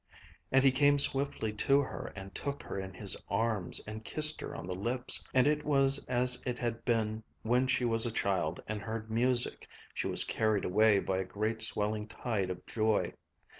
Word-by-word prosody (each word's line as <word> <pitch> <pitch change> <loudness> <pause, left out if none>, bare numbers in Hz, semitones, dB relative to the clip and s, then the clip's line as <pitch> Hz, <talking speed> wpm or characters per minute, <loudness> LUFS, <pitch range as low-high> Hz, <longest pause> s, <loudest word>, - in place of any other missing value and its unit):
And 135 0 +4
he 135 - +6
came 145 +2 +4
swiftly 135 -6 +3
to 135 +6 +3
her 135 - -6
and 95 -1 -9
took 140 0 -4
her - - -5
in 95 0 -6
his 100 0 -2
arms 105 -3 -1
and 110 +1 -7
kissed 155 +5 0
her - - -6
on - - -6
the 90 - -4
lips. 120 +7 +1
And 130 -1 +4
it 150 0 +1
was 140 -1 +2
as 125 0 +3
it 125 -1 -3
had 115 -2 -3
been 110 -2 0 0.2
when 125 +3 +2
she 125 -1 +1
was 115 0 +2
a - - -3
child 100 -3 -1
and 105 -1 -4
heard 110 +2 -5
music, 120 +2 +1 0.3
she - - -2
was - - +1
carried 110 -2 0
away 105 +2 +4
by 95 -1 -1
a - - 0
great 110 +4 -3
swelling 105 -1 0
tide 110 -6 -2
of 90 -1 -6
joy 110 -1 0
115 Hz, 195 wpm, -31 LUFS, 105-130 Hz, 0.3 s, he